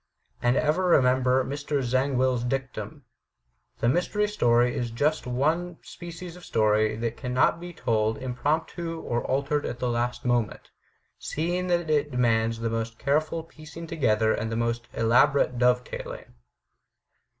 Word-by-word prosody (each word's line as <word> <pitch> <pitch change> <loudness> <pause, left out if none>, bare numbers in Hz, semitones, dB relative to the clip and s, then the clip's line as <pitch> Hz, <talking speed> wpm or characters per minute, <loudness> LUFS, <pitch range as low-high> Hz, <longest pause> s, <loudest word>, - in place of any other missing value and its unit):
And 120 +2 +2
ever 155 +5 +1
remember 130 -4 +3
Mr. 145 0 -2
Zangwill's 130 -1 +1
dictum: 135 +3 -4 0.8
"The 115 - +2
mystery 180 - +1
story 120 - +2
is 120 -1 -2
just 145 +7 0
the - - -5
one 160 +7 0
species 175 0 -9
of 180 - -13
story 110 -3 +2
that 115 +1 -3
can 125 0 -4
not 130 +5 +3
be 175 +1 -7
told 110 -7 0
impromptu 160 +6 -2
or 120 -6 -2
altered 140 +2 0
at - - -4
the 125 0 -1
last 120 +1 -2
moment, 120 -3 -1 0.5
seeing 175 +4 -2
that 175 -2 +1
it 150 -1 +1
demands 115 -3 +1
the 115 - 0
most 115 0 -3
careful 155 +5 0
piecing 160 +1 -11
together 110 -9 +1
and 110 +1 -3
the - - -1
most 115 +1 -1
elaborate 125 +2 +3
dove 125 0 +3
tailing." - - -8
130 Hz, 150 wpm, -26 LUFS, 120-155 Hz, 0.8 s, remember